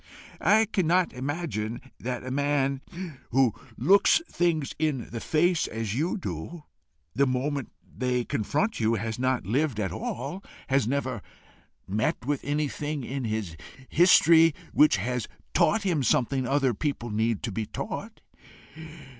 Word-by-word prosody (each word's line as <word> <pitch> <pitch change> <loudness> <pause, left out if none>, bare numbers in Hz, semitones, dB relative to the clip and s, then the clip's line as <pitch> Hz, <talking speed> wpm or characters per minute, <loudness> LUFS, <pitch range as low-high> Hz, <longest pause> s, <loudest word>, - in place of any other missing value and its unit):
"I 220 +2 +5
cannot 185 -4 +1
imagine 125 -5 -3 0.2
that 125 0 -4
a 130 - -4
man 140 -1 +1 0.5
who 130 -3 +3 0.2
looks 200 - +5
things 165 -5 0
in 150 -6 -1
the 115 - -4
face 165 +6 +2
as 110 -2 -3
you 155 - 0
do, 150 - -6 0.5
the 140 +1 +3
moment 135 +2 -2
they 125 -1 -2
confront 150 - -1
you, 115 0 +2
has 110 +1 -3
not 130 -4 0
lived 130 - 0
at 95 -3 -1
all, 205 -4 -5 0.3
has 135 -4 +2
never 130 -4 -1 0.7
met 110 +4 -1
with 145 0 -1
anything 145 0 -2
in 135 +1 -4
his 110 -7 -3 0.3
history 165 -2 +6 0.2
which 150 -8 +5
has 125 +4 -2 0.3
taught 220 +1 +3
him 175 -7 +1
something 130 +1 +1
other 135 -2 +2
people 120 -2 -3
need 110 +1 0
to 115 - -2
be 110 +2 -3
taught. - - -6
135 Hz, 140 wpm, -27 LUFS, 115-155 Hz, 0.7 s, history